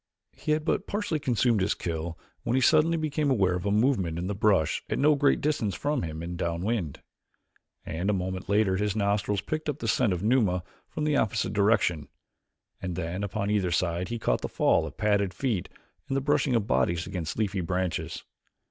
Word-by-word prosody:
He 155 Hz, -, -1 dB
had 155 Hz, 0 st, -1 dB
but 195 Hz, -, 0 dB
partially 205 Hz, -6 st, -1 dB
consumed 120 Hz, -5 st, +2 dB
his 95 Hz, +3 st, +1 dB
kill 85 Hz, 0 st, -4 dB, 0.2 s
when 120 Hz, -, -1 dB
he -, -, +4 dB
suddenly 160 Hz, +5 st, +4 dB
became 155 Hz, -2 st, 0 dB
aware 95 Hz, -8 st, +3 dB
of 90 Hz, +2 st, -2 dB
a -, -, +1 dB
movement 105 Hz, -7 st, +2 dB
in 85 Hz, -, -3 dB
the 100 Hz, -, -2 dB
brush 100 Hz, -6 st, +2 dB
at -, -, -1 dB
no 150 Hz, +3 st, +5 dB
great 145 Hz, -1 st, +2 dB
distance 115 Hz, -, 0 dB
from 145 Hz, +5 st, -1 dB
him 80 Hz, 0 st, -5 dB
and 85 Hz, +1 st, -5 dB
downwind, 85 Hz, -, -2 dB, 0.8 s
and 85 Hz, +5 st, -2 dB
a -, -, +3 dB
moment 95 Hz, 0 st, -3 dB
later 100 Hz, -2 st, +3 dB
his 105 Hz, 0 st, 0 dB
nostrils 100 Hz, -1 st, 0 dB
picked 155 Hz, 0 st, -3 dB
up 145 Hz, -, -2 dB
the -, -, -4 dB
scent 120 Hz, -6 st, +2 dB
of 90 Hz, 0 st, -2 dB
Numa 105 Hz, -7 st, +2 dB, 0.3 s
from 155 Hz, -, -4 dB
the 150 Hz, -1 st, +2 dB
opposite 100 Hz, -4 st, 0 dB
direction, 100 Hz, -8 st, +2 dB, 0.7 s
and 90 Hz, -2 st, -3 dB
then 90 Hz, +3 st, -3 dB
upon 100 Hz, +1 st, -2 dB
either 100 Hz, -4 st, +1 dB
side 85 Hz, +1 st, 0 dB
he 120 Hz, -, -2 dB
caught 110 Hz, -, 0 dB
the -, -, -3 dB
fall -, -, +2 dB
of -, -, -11 dB
padded 100 Hz, -2 st, +1 dB
feet 115 Hz, -10 st, -1 dB, 0.4 s
and 135 Hz, -, 0 dB
the -, -, 0 dB
brushing 145 Hz, -2 st, +2 dB
of 110 Hz, -3 st, +1 dB
bodies 85 Hz, +4 st, +1 dB
against 90 Hz, -4 st, -4 dB
leafy 100 Hz, -3 st, 0 dB
branches. 90 Hz, 0 st, -2 dB
100 Hz, 200 wpm, -27 LUFS, 90-130 Hz, 0.8 s, no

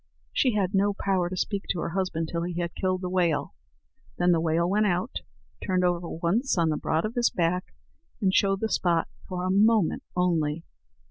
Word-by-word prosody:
She 250 Hz, -5 st, +2 dB
had 195 Hz, -1 st, 0 dB
no 200 Hz, +1 st, +2 dB
power 190 Hz, -3 st, 0 dB
to 185 Hz, -, -5 dB
speak 200 Hz, +1 st, -2 dB
to 180 Hz, -, -1 dB
her -, -, -2 dB
husband 170 Hz, -3 st, -2 dB
till 170 Hz, -, -1 dB
he 175 Hz, 0 st, -3 dB
had 170 Hz, -1 st, -2 dB
killed 185 Hz, -1 st, -1 dB
the 180 Hz, -, -3 dB
whale. 170 Hz, -6 st, +1 dB, 0.6 s
Then 175 Hz, 0 st, +3 dB
the 170 Hz, -, +3 dB
whale 165 Hz, +1 st, +1 dB
went 210 Hz, +3 st, +2 dB
out, 180 Hz, +6 st, -1 dB, 0.5 s
turned 185 Hz, -1 st, +1 dB
over 175 Hz, -1 st, 0 dB
once 190 Hz, +10 st, 0 dB
on 165 Hz, -2 st, +3 dB
the 155 Hz, -, +1 dB
broad 160 Hz, +4 st, 0 dB
of 215 Hz, -, -3 dB
his 240 Hz, -1 st, +2 dB
back, 180 Hz, +1 st, -1 dB, 0.4 s
and 190 Hz, -2 st, +1 dB
showed 195 Hz, 0 st, +2 dB
the 220 Hz, -, +1 dB
spot 170 Hz, -5 st, +1 dB, 0.2 s
for 180 Hz, -1 st, -3 dB
a 185 Hz, -, +1 dB
moment 210 Hz, -1 st, +3 dB
only. 165 Hz, -3 st, 0 dB
180 Hz, 200 wpm, -26 LUFS, 170-195 Hz, 0.6 s, Then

